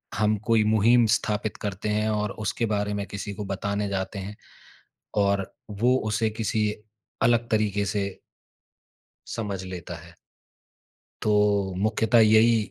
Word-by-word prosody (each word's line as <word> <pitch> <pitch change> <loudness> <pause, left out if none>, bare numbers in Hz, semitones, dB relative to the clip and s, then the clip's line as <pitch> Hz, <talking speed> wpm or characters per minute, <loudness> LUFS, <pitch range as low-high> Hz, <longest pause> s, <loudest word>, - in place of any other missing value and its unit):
हम 105 0 +2
कोई 115 -2 +4
मुहिम 110 +3 +4
स्थापित 105 0 -2
करते 100 +1 -3
हैं 105 +1 +1
और 105 -1 -1
उसके 115 +3 0
बारे 105 -1 -1
में 100 -1 -3
किसी 100 0 -6
को 105 - -6
बताने 100 +1 -2
जाते 100 +1 -3
हैं 100 +2 -7 0.9
और 100 -1 0 0.3
वो 125 +2 +4
उसे 110 +1 +1
किसी 110 0 -1 0.6
अलग 120 0 +3
तरीके 105 -2 +1
से 100 -1 -1 1.3
समझ 100 -5 -4
लेता 90 -1 -7
है। 85 +1 -14 1.1
तो 105 -1 +2 0.5
मुख्यतः 110 +1 +3
यही 110 +1 +6
105 Hz, 130 wpm, -25 LUFS, 100-110 Hz, 1.3 s, यही